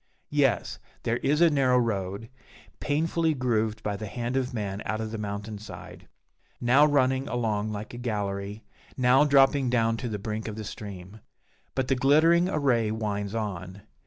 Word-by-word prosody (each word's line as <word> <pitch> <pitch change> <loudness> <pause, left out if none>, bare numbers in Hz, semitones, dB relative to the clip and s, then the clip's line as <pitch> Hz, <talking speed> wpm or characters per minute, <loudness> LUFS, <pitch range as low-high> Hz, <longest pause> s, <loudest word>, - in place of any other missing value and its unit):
Yes, 140 -5 +1 0.2
there 115 +1 0
is 150 +5 +1
a 170 -2 +6
narrow 130 -3 +3
road, 100 -3 -1 0.5
painfully 160 +2 0
grooved 110 -4 0
by 105 -1 -2
the 110 - -6
hand 120 +4 -3
of 130 -1 0
man 105 -4 -4
out 110 - -2
of 110 -1 -4
the 110 - -4
mountain 105 0 -5
side, 110 - -11 0.5
now 130 +4 +5
running 135 -2 +2
along 110 -3 -1
like 105 +2 -6
a 120 - -7
gallery, 105 -2 -3 0.3
now 130 +3 +5
dropping 135 -2 +4
down 115 -2 +2
to 120 - -4
the 105 - -3
brink 110 +2 -4
of 110 - -5
the 110 - -6
stream. 100 -1 -8 0.6
But 130 -1 0
the 135 - +2
glittering 160 +7 +4
array 130 - +1
winds 105 -1 -3
on. 100 -3 -5
115 Hz, 165 wpm, -27 LUFS, 105-135 Hz, 0.6 s, a